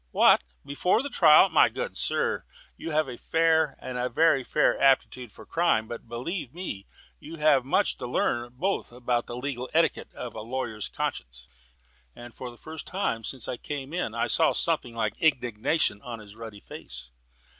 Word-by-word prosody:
"What, - - +5 0.2
before 180 - +1
the 285 - -5
trial? 165 -4 +7
My - - +5
good 485 0 -5
sir, 475 0 0 0.3
you - - -7
have 155 -1 +1
a 125 -2 -8
fair, 160 -2 +2
a 125 0 -3
very 145 0 +3
fair, 150 - +1
aptitude 130 -3 +2
for - - -13
crime, 165 -10 +1
but 120 0 -8
believe 125 - -5
me, 140 - -6 0.3
you 165 - -9
have 150 -4 +4
much 135 - +1
to 125 - -5
learn 120 0 0
both 185 +6 -2
of 125 +1 -15 0.3
legal 125 +1 -4
etiquette 165 0 +2
and - - -6
of 125 - -6
a 110 - -6
lawyer's 115 -2 -4
conscience." - - -5 0.7
And 120 -1 -11
for 125 - -7
the 120 - -13
first 160 +3 -9
time 115 - -2
since 130 +1 -2
I 125 - -3
came 145 +2 -6
in 175 -11 -2
I 115 - +1
saw - - +2
something 120 -1 0
like 110 -2 -2
indignation 125 -4 +1
on 120 -2 -7
his 105 -1 -13
ruddy 110 -3 -9
face. 60 0 -10
125 Hz, 175 wpm, -27 LUFS, 115-160 Hz, 0.7 s, trial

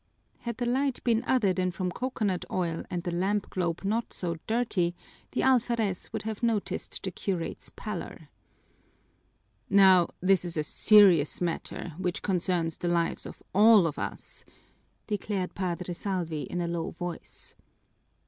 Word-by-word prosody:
Had 235 -2 -5
the 245 - -1
light 265 +2 0
been 230 -1 +2
other 220 -8 +3
than 185 0 0
from 180 0 -3
coconut 215 -5 -2
oil 170 -3 -1
and 175 -1 -3
the 175 -2 -3
lamp 195 +3 0
globe 175 -3 -1
not 220 +4 -1
so 170 -2 -3
dirty, 215 -7 0 0.4
the - - 0
alferez 235 -7 +1
would - - -4
have 220 0 -4
noticed 230 -4 -1
the 190 - -2
curate's 180 -2 -4
pallor. 175 -6 -6 1.4
"Now 190 -3 +6
this 190 0 +3
is 170 -2 -4
a 155 - +1
serious 185 -4 +5
matter, 175 -1 -3
which 180 -2 -2
concerns 175 -4 0
the 175 - -3
lives 170 -1 0
of - - -12
all 210 -1 +7
of 160 - -2
us," - - -6 0.6
declared 205 -3 -2
Padre 180 -1 -3
Salvi 170 -5 -3
in 175 - -2
a 170 - -1
low 170 -1 -2
voice. 175 0 -7
185 Hz, 150 wpm, -28 LUFS, 175-215 Hz, 1.4 s, all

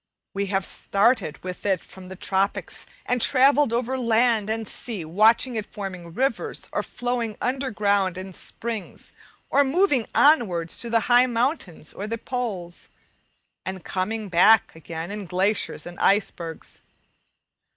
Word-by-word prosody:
We 200 0 -2
have 195 0 0
started 200 - +1
with 180 -1 -6
it 190 -4 0
from 190 -1 -13
the 190 - -8
tropics, 195 +1 -1 0.2
and 250 -1 0
travelled 275 +1 +5
over 250 +2 -1
land 230 -2 +2
and 220 -1 -2
sea, 210 -7 -4
watching 220 +8 +4
it 215 - -5
forming 180 -5 -7
rivers, 270 +2 -1
or - - 0
flowing 245 -3 -3
underground 205 -8 0
in 190 0 -7
springs, 225 +1 -6 0.4
or 285 - +5
moving 285 - +2
onwards 195 - +3
to 235 - -4
the 230 0 +3
high 245 +3 +5
mountains 230 - -2
or 205 - -5
the 230 +1 -3
poles, 215 -9 -5 0.7
and 190 -2 -6
coming 210 +3 -2
back 195 +4 +5
again 165 +2 -6
in 205 -2 -6
glaciers 190 +4 0
and 175 0 -9
icebergs. 195 -5 -1
210 Hz, 140 wpm, -24 LUFS, 185-245 Hz, 0.7 s, travelled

